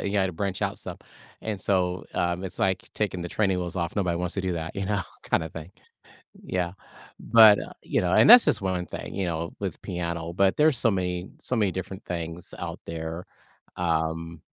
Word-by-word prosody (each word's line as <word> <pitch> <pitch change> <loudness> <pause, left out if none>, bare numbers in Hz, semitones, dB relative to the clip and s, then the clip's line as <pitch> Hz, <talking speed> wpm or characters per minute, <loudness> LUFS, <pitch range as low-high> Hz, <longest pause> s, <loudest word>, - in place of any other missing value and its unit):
you 100 - -2
gotta 95 -2 +1
branch 95 +2 -3
out - - -1
some, - - -7 0.4
and 105 -3 -4
so, 90 -2 0
um, 85 +1 0
it's 95 - -6
like 95 -1 0
taking 95 -4 -1
the 90 - -4
training 95 -1 +1
wheels 90 -1 -4
off, 85 -2 -2
nobody 90 -4 +1
wants 90 0 -2
to 95 - -1
do 95 -1 -1
that, 80 -2 -5
you 100 - -1
know, 100 +1 0 0.3
kinda 80 - +1
thing, 80 +3 -9 0.7
yeah, 90 -1 -2 0.5
but, 110 -2 +7
uh, - - -7
you - - 0
know, 90 0 +1
and - - +6
that's 245 +1 +11
just - - +2
one 90 -2 -1
thing, - - -7
you 95 -1 -1
know, 85 -1 -3
with - - -4
piano, 85 -1 -4
but 95 +1 +3
there's 150 -3 +4
so 115 0 +3
many 90 -1 -2
so 125 - -3
many 105 -5 +2
different 95 +1 -6
things 85 -1 -5
out - - -5
there, 80 +1 -5 0.5
um, 80 -1 -1
90 Hz, 200 wpm, -26 LUFS, 85-95 Hz, 0.7 s, that's